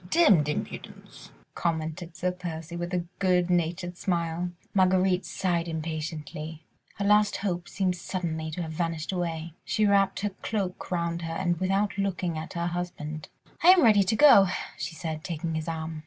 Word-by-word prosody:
"Demmed 200 - +5
impudence," 150 - -6 0.2
commented 165 +1 -3
Sir 180 0 0
Percy 170 -2 -6
with 175 +1 -4
a 180 -1 -1
good 180 -2 +2
natured 175 +1 0
smile. 170 -1 -1 0.2
Marguerite 185 -1 +3
sighed 175 -3 -1
impatiently. 160 -1 -5 0.3
Her 200 - -2
last 210 0 +4
hope 175 -3 -3
seemed 185 -2 0
suddenly 165 -3 -3
to 170 +3 -4
have 160 - -5
vanished 165 0 -2
away. 165 -3 -3
She 215 - +1
wrapped 200 -1 +3
her 205 - 0
cloak 195 -5 -3
round 170 -1 -1
her 165 0 -4
and 175 -2 0
without 195 +2 0
looking 185 -3 -1
at 155 0 -6
her 170 0 -2
husband: 170 -3 -4 0.3
"I 330 - +3
am 365 -2 +8
ready 215 -3 +6
to 200 +3 +1
go," 230 -7 +8 0.3
she 165 - -5
said, 160 -1 -5
taking 165 -1 -3
his 160 0 -3
arm. 160 -1 -4
175 Hz, 165 wpm, -27 LUFS, 160-190 Hz, 0.3 s, am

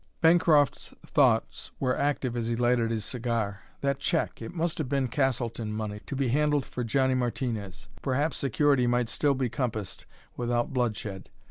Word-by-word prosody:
Bancroft's 160 -3 +3
thoughts - - +2
were 130 -2 +1
active 135 -4 0
as 115 -1 -1
he 115 - 0
lighted 120 -1 +2
his 110 -2 -2
cigar. 115 -5 -2 0.2
That 140 0 0
check 160 +4 -1
it - - -6
must 170 -1 -2
have 145 -5 -2
been 135 -2 +1
Castleton 120 -4 -1
money, 105 -1 -4
to - - -4
be 135 -2 0
handled 150 +1 +2
for 125 - -4
Johnny 130 +3 +2
Martinez. 120 -6 -3
Perhaps 140 +4 0
security 140 -1 +2
might 120 -1 +1
still 145 -2 +1
be 130 -1 0
compassed 110 -5 -4 0.3
without 120 +1 -1
bloodshed. 110 -6 -2
125 Hz, 160 wpm, -28 LUFS, 115-140 Hz, 0.3 s, Bancroft's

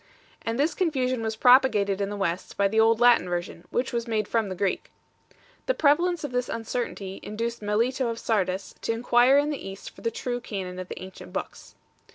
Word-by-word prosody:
And 225 +1 -2
this 295 +4 +2
confusion 260 -8 0
was 220 0 -2
propagated 220 -5 +4
in 200 - -1
the 205 - -5
West 185 -2 -3
by 200 - +4
the 220 +3 +1
old 225 0 +4
Latin 240 -7 +5
Version, 175 -1 -4
which 245 +1 -1
was 235 0 -2
made 215 -2 0
from 225 -3 0
the 185 - -4
Greek. 190 +1 -1 0.8
The - - +2
prevalence 335 +3 +2
of 290 - -4
this 250 0 -1
uncertainty 225 -4 -4
induced 230 +2 -4
Melito 235 +5 0
of 230 -1 -3
Sardes 195 -4 -1
to 230 - 0
enquire 240 +3 +4
in 290 +1 +2
the 280 -9 -5
East 195 0 -9
for - - -16
the 230 - 0
true 245 +2 -3
canon 185 -5 -5
of 185 - -6
the - - -7
ancient 185 - -10
i - - -17
Books. - - -6
230 Hz, 205 wpm, -26 LUFS, 200-250 Hz, 0.8 s, Latin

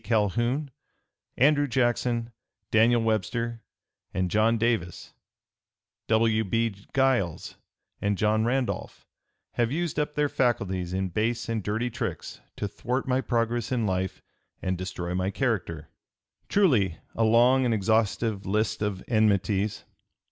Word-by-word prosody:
Calhoun, 120 - 0 0.7
Andrew 145 +2 +4
Jackson, 120 -2 0 0.4
Daniel 115 +1 +4
Webster, 115 +2 -1 0.5
and 90 -1 0
John 110 +2 +3
Davis, 110 -7 -1 0.9
W. 110 0 +3
B. 115 +3 0 0.2
Giles, 130 -11 +1 0.5
and 100 -1 0
John 110 +2 +2
Randolph, 125 +2 -2 0.5
have 120 0 0
used 170 +1 -1
up 150 0 -2
their 150 -1 +2
faculties 95 -10 0
in 95 0 -1
base 110 +6 -1
and 115 -2 -1
dirty 110 +5 -2
tricks 120 - -5
to 105 - -3
thwart 125 +6 -3
my 130 0 +2
progress 120 -1 -1
in 120 -3 +1
life 95 -1 -2 0.4
and 95 0 -1
destroy 90 -1 -4
my 95 +1 0
character." 95 - -2 0.6
Truly 115 - +3 0.2
a 115 - 0
long 120 +4 +5
and 125 - +1
exhaustive 110 0 +1
list 105 +2 0
of 100 -3 -2
enmities! 105 -2 +1
115 Hz, 125 wpm, -27 LUFS, 100-120 Hz, 0.9 s, long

